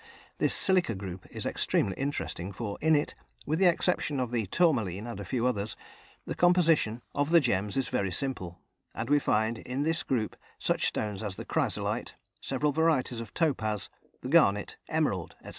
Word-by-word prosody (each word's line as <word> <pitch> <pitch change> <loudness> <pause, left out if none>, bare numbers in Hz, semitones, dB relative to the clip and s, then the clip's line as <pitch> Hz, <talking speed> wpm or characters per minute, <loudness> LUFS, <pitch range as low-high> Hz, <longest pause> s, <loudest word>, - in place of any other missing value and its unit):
This - - +3
silica 180 - +2
group 95 -1 -7
is - - -6
extremely 95 - +1
interesting, 135 -9 -3
for 100 0 -4
in 160 0 +4
it, 145 - 0 0.3
with 155 +3 0
the 190 - +6
exception 170 -4 +1
of 125 -2 -1
the 115 -4 -1
tourmaline 110 - +1
and 120 - -6
a - - -4
few 125 -2 -1
others, 110 -4 -1 0.5
the - - -3
composition 165 -10 +3
of 145 +1 0
the 170 0 +7
gems 105 - 0
is 135 - +1
very 100 - 0
simple, 95 -9 -3 0.4
and 115 +5 -3
we 145 - +6
find 110 -3 +1
in 130 +3 -3
this 165 +2 +1
group 115 -5 -1 0.2
such - - +1
stones 105 -2 -2
as 105 -3 -4
the - - -7
chrysolite, - - -1 0.3
several 135 +2 0
varieties 140 -6 +1
of 115 - -9
topaz, 110 - 0 0.3
the 125 - -5
garnet, 105 -11 +4
emerald, 140 - 0
etc. - - -10
125 Hz, 175 wpm, -29 LUFS, 105-155 Hz, 0.5 s, the